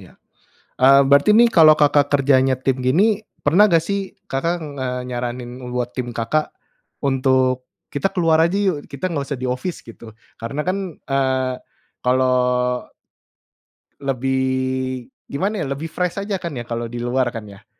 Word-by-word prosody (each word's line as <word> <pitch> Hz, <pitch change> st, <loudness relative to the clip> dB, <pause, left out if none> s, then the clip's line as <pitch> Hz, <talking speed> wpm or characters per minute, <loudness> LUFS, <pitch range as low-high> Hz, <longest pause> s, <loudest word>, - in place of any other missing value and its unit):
iya, -, -, -15 dB, 0.7 s
eee, 135 Hz, +1 st, +7 dB
berarti 140 Hz, +6 st, +4 dB
ini, 235 Hz, +2 st, +7 dB
kalo 155 Hz, -5 st, +7 dB
Kakak 145 Hz, -1 st, +3 dB
kerjanya 135 Hz, -2 st, +3 dB
tim, 130 Hz, 0 st, -1 dB
gini, 195 Hz, -, +2 dB, 0.2 s
pernah 190 Hz, +9 st, +5 dB
gak, 165 Hz, -2 st, +3 dB
sih, 200 Hz, +1 st, -3 dB
Kakak 165 Hz, +6 st, -1 dB
ngenyaranin 125 Hz, -3 st, -5 dB
buat 125 Hz, 0 st, -3 dB
tim 125 Hz, -2 st, -4 dB
Kakak, 135 Hz, +7 st, 0 dB, 0.6 s
untuk, 130 Hz, -1 st, +1 dB, 0.2 s
"Kita 145 Hz, +7 st, 0 dB
keluar 165 Hz, -4 st, +2 dB
aja, 170 Hz, +4 st, +2 dB
yuk, 185 Hz, -8 st, -1 dB
kita, 140 Hz, +5 st, -5 dB
gak 145 Hz, -4 st, -2 dB
usah 140 Hz, -, -3 dB
di 130 Hz, -, -5 dB
office." 130 Hz, +8 st, -4 dB
Gitu. 115 Hz, -1 st, -12 dB, 0.3 s
Karena 140 Hz, +6 st, -3 dB
kan, 185 Hz, -2 st, -3 dB
eee, 130 Hz, -2 st, -1 dB, 0.5 s
kalo 130 Hz, +1 st, +2 dB, 1.7 s
lebih, 130 Hz, -1 st, -1 dB, 0.2 s
gimana 195 Hz, +8 st, -2 dB
ya, -, -, -5 dB
lebih 150 Hz, +4 st, -5 dB
fresh 180 Hz, +4 st, -2 dB
aja 200 Hz, 0 st, -2 dB
kan, 170 Hz, -3 st, -5 dB
ya, 120 Hz, -3 st, -5 dB
kalau 120 Hz, 0 st, -3 dB
di 120 Hz, +1 st, -6 dB
luar 120 Hz, 0 st, 0 dB
kan, 110 Hz, -2 st, -7 dB
ya. 100 Hz, -1 st, -15 dB
135 Hz, 150 wpm, -20 LUFS, 125-160 Hz, 1.7 s, eee